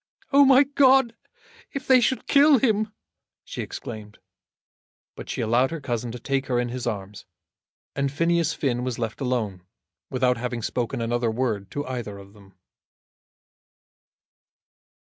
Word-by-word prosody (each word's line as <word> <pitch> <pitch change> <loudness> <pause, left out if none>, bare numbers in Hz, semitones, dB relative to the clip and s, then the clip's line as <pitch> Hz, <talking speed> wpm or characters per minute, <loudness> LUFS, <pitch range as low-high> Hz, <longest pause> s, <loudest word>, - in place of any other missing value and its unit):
"Oh, 280 +1 +8
my 270 0 +7
God, 270 -3 +4 0.6
if 275 -1 -5
they 255 -1 +5
should 260 +2 0
kill 285 0 +6
him!" 215 -3 +1 0.5
she - - -6
exclaimed. 105 -2 -8 1.0
But - - -9
she - - -3
allowed 120 +3 +2
her 165 0 -5
cousin 120 -4 -3
to 125 - -6
take 135 +2 -2
her 125 -2 +1
in 120 0 -1
his 125 0 -4
arms, 100 -2 -5 0.7
and 140 -1 0
Phineas 165 +1 +1
Finn 125 -3 -1
was 125 -2 -3
left 115 +2 -4
alone 115 -8 -2 0.5
without 125 -1 +1
having 120 -1 -4
spoken 120 0 -2
another 120 0 0
word 110 -4 -2
to 145 0 -3
either 120 -6 -5
of 100 0 -14
them. 100 -2 -19
125 Hz, 145 wpm, -24 LUFS, 115-170 Hz, 1.0 s, Oh